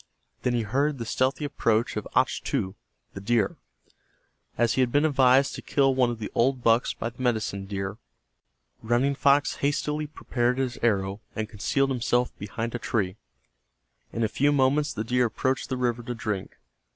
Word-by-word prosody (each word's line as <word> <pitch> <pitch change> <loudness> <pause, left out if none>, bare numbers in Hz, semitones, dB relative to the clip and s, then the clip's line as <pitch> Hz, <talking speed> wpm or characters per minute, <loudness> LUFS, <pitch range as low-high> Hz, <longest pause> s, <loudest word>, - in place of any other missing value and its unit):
Then 125 -1 0
he 115 - +1
heard 140 +7 0
the 115 - -5
stealthy 130 +6 0
approach 115 -5 0
of - - -4
Achtu, 95 0 0 0.4
the 100 - -7
deer. 110 -1 +1 1.0
As 120 -1 +2
he 130 - +2
had 125 -2 +2
been 145 +3 +3
advised 135 -2 +4
to - - -6
kill 135 -2 +2
one 130 -2 +3
of 120 - -3
the 110 -2 -6
old 125 +1 +1
bucks 115 +1 +3
by 115 - -4
the 125 - -12
medicine 110 -5 -1
deer, 95 0 -4 0.8
Running 120 +5 +1
Fox 140 +1 +3
hastily 150 +1 -1
prepared 125 -4 -1
his 130 -3 -2
arrow 100 -3 0
and 110 0 -2
concealed 135 +6 0
himself 125 0 0
behind 115 +3 -4
a 120 - -3
tree. 105 -6 -1 0.9
In 115 - -2
a - - +3
few 145 +7 +2
moments 145 +2 +2
the 110 - -3
deer 125 +2 +2
approached 130 +3 -1
the 130 - -2
river 120 -1 0
to 120 +1 -5
drink. 105 -4 -4
120 Hz, 175 wpm, -26 LUFS, 110-135 Hz, 1.0 s, advised